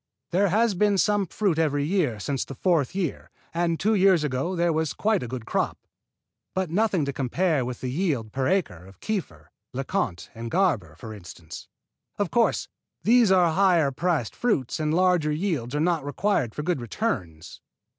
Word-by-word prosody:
There 195 +3 +3
has 220 +3 +2
been 205 +2 +2
some 205 0 +2
fruit 185 -3 0
every 145 -3 +1
year 155 - 0
since 135 +6 -2
the 135 - -9
fourth 170 -1 +1
year, 180 -7 -3 0.2
and 170 -1 0
two 220 +2 +2
years 190 -5 +4
ago 145 +6 -1
there 170 -1 +2
was 160 -1 -1
quite 215 -2 +1
a 125 - -4
good 120 -1 -6
crop, - - -1 0.8
but 190 -3 -1
nothing 190 -4 +1
to 140 - -3
compare 145 +3 0
with 125 0 -5
the 125 - -3
yield 140 - -1
per 130 +2 -1
acre 180 - 0
of 95 -1 -17
Kieffer, 210 -5 -4 0.2
LeConte 130 - -2
and 115 0 -6
Garber, 120 - +1
for 110 +6 -9
instance. 85 -4 -10 0.5
Of 200 -5 -1
course, 235 -1 +2 0.4
these 230 -2 +5
are 175 -3 +4
higher 175 -6 +3
priced 150 -4 -1
fruit 160 - 0
and 155 -1 0
large 180 -2 +3
yields 150 - -1
are - - 0
not 165 -1 +1
required 145 - -1
for 150 - -3
good 170 -5 -1
returns. 105 - -4
160 Hz, 175 wpm, -25 LUFS, 130-190 Hz, 0.8 s, these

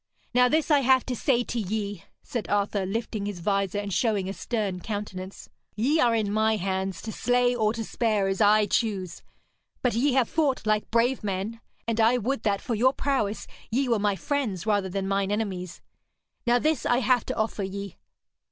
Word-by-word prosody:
'Now 250 0 +5
this 315 +2 +1
I 290 - +6
have 260 -1 +4
to 255 - -2
say 245 0 +2
to 240 - -3
ye,' 205 -2 -3 0.2
said 235 -4 -4
Arthur, 200 -1 0
lifting 215 0 -3
his 200 -3 -5
vizor 195 +1 0
and 205 -1 -3
showing 210 -4 +1
a 195 - -3
stern 205 -5 -2
countenance. 195 -1 -6 0.3
'Ye 270 +10 +2
are 235 -5 +4
in 210 -2 0
my 220 +1 +3
hands, 190 -2 -2
to 220 - -4
slay 245 +2 +2
or 215 -3 +2
spare 220 -2 0
as 195 +2 -1
I 210 0 +5
choose. 200 -5 -1 0.6
But 250 - +2
ye 255 +5 +2
have 255 -3 +3
fought 290 -7 0
like 215 0 +1
brave 235 +2 +2
men, 205 +3 -3 0.3
and 230 -1 -1
I 230 +3 +5
would 245 +2 -1
that, 200 -3 0
for 240 - -3
your 250 +4 +3
prowess, 265 -8 -1 0.2
ye 260 +4 +1
were 230 -3 +2
my 205 -1 +1
friends 220 - -2
rather 205 -3 +1
than 195 +1 -2
mine 195 0 0
enemies. 190 -5 -3 0.6
Now 240 +1 +5
this 305 +1 +1
I 245 - +2
have 250 -2 +2
to - - -2
offer 220 -1 -1
ye. 200 0 -5
215 Hz, 190 wpm, -26 LUFS, 200-245 Hz, 0.6 s, I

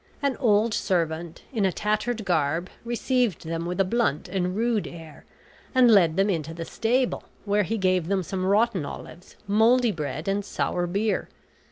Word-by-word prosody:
An 280 -2 +1
old 220 -2 +3
servant, 170 -3 -1
in 220 -4 0
a 190 - +3
tattered 215 +3 -1
garb, 165 0 0
received 240 - 0
them 165 +1 -3
with 180 +1 -3
a - - +6
blunt 185 -8 0
and 180 0 -2
rude 225 -1 0
air, 160 -3 -11 0.5
and 250 -2 +6
led 170 -6 +5
them 195 +1 +3
into 165 -4 -2
the 165 0 -5
stable, 245 +6 0 0.2
where 205 0 +2
he 220 +3 -1
gave 185 -4 +1
them 195 0 0
some 185 +2 -3
rotten 200 -1 +2
olives, 170 +4 -9
moldy 225 +4 +4
bread, 155 -2 -5
and 200 +1 0
sour 175 -2 -1
beer. 205 +5 -1
195 Hz, 170 wpm, -25 LUFS, 170-225 Hz, 0.5 s, a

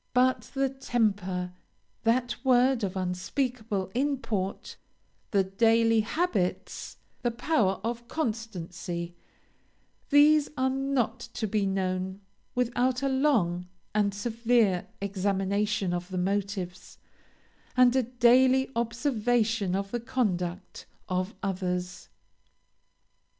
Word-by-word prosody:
But 255 +1 +3
the 270 0 +2
temper 205 -9 -1 0.5
that 240 +1 +2
word 255 -2 +4
of 190 -1 -2
unspeakable 200 +2 -2
import 245 -8 -2 0.5
the 200 -2 +3
daily 225 +3 +3
habits, 220 - -1 0.2
the 240 - +1
power 230 - +1
of 235 +1 -3
constancy 180 - -4 1.0
these 295 +1 +6
are 260 0 +2
not 270 -3 0 0.2
to 240 - -1
be 210 -1 0
known 190 0 -2 0.4
without 250 +1 +1
a 275 - +2
long 220 - +1 0.3
and 205 -1 +2
severe 225 -2 +1
examination 200 0 0
of 175 +1 -3
the 185 - -4
motives, 190 -1 -3 0.8
and 250 0 +6
a 260 - +4
daily 255 +2 +4
observation 230 -4 +1
of 195 0 -3
the 240 - -1
conduct, 195 -8 -2 0.2
of 185 +4 -1
others. 180 -2 -3
220 Hz, 100 wpm, -28 LUFS, 190-250 Hz, 1.0 s, these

